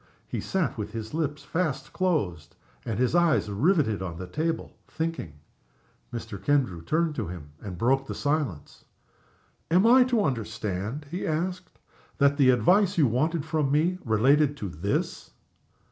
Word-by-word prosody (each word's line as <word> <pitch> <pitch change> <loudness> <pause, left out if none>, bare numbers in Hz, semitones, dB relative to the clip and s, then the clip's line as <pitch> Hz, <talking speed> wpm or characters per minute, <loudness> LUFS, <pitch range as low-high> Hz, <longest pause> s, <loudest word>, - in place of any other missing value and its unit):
He - - -3
sat 185 -10 -1
with 105 +1 -5
his 110 +1 -6
lips 155 -2 -2
fast 155 -5 -2
closed 100 - -1 0.3
and 110 -4 -2
his 125 +3 +1
eyes 170 -10 +3
riveted 130 - +2
on 85 -3 -5
the 90 - -6
table, 160 - -3
thinking. 160 - -4 0.8
Mr. 110 -4 -7
Kendrew 130 - +1
turned 160 - +1
to 115 - -3
him, 80 -4 -8
and 95 -4 -7
broke 135 +6 +2
the - - -5
silence. 145 - -2 0.9
"Am 180 +5 +4
I 250 +2 +7
to 240 -4 +2
understand," 110 - -3
he 180 - -3
asked, 180 +3 -3 0.4
"that 140 0 +3
the 135 -3 +5
advice 180 - +4
you 155 - +5
wanted 145 +6 0
from 155 -4 0
me 170 +5 +2
related 140 +6 +3
to 100 -8 -5
_this? 90 +7 -2
140 Hz, 150 wpm, -27 LUFS, 110-165 Hz, 0.9 s, I